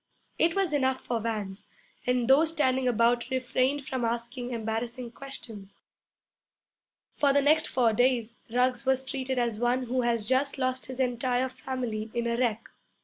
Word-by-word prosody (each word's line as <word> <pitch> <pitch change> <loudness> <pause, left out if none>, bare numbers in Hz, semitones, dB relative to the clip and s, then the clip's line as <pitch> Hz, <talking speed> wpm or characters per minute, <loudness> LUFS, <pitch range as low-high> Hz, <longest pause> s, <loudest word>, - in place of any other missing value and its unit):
It 330 0 +3
was 385 -5 +1
enough 260 -2 +2
for 235 -2 -2
Vance, 210 -3 -4 0.4
and 250 -1 +2
those 295 +5 +5
standing 265 -5 +1
about 235 +1 +2
refrained 260 +2 0
from 260 -2 -3
asking 235 +2 -3
embarrassing 235 +1 -3
questions. 230 -7 -9 1.3
For 285 -1 +2
the 285 +1 +4
next 310 +2 +4
four 240 -3 +2
days 240 -1 +1
Ruggs 250 +1 +1
was 265 0 +1
treated 260 -1 -3
as 235 -3 0
one 245 +2 +1
who 250 +1 0
has 230 -3 0
just 265 +3 +1
lost 255 -1 -1
his 260 0 -7
entire 250 0 +1
family 245 -5 -4
in 235 0 0
a 235 0 0
wreck. 235 -2 -1
250 Hz, 155 wpm, -28 LUFS, 235-260 Hz, 1.3 s, those